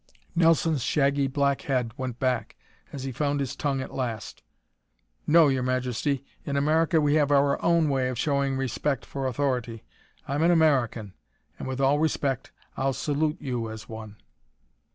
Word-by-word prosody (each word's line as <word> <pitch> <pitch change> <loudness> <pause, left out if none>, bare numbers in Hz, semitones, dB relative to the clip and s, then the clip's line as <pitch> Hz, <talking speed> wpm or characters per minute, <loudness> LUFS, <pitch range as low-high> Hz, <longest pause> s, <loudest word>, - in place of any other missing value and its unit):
Nelson's 165 -3 +3
shaggy 140 +2 +2
black 140 0 +1
head 125 -5 -1
went 130 -2 -4
back 130 -1 -1 0.4
as 135 - -6
he 135 - -3
found 145 +2 -1
his 135 -1 -3
tongue 140 -2 -1
at 130 - -7
last. 120 -4 -4 0.9
"No, 160 0 +6
Your 135 -2 +1
Majesty. 130 +2 -1 0.2
In 140 -1 -2
America 160 +4 +3
we 145 -1 +2
have 150 -2 +3
our 140 -1 +3
own 170 -2 +3
way 135 -3 +1
of 130 - -4
showing 140 0 0
respect 135 0 -1
for 135 -1 -3
authority. 125 -4 -2 0.4
I'm 140 +3 -1
an 165 - +4
American 130 - +2 0.5
and, - - -5
with 130 0 -4
all 135 +2 +3
respect, 140 -4 -1 0.2
I'll 135 0 0
salute 150 +4 -1
you 120 -4 -3
as 110 0 -8
one." 110 -2 -8
135 Hz, 160 wpm, -26 LUFS, 130-145 Hz, 0.9 s, No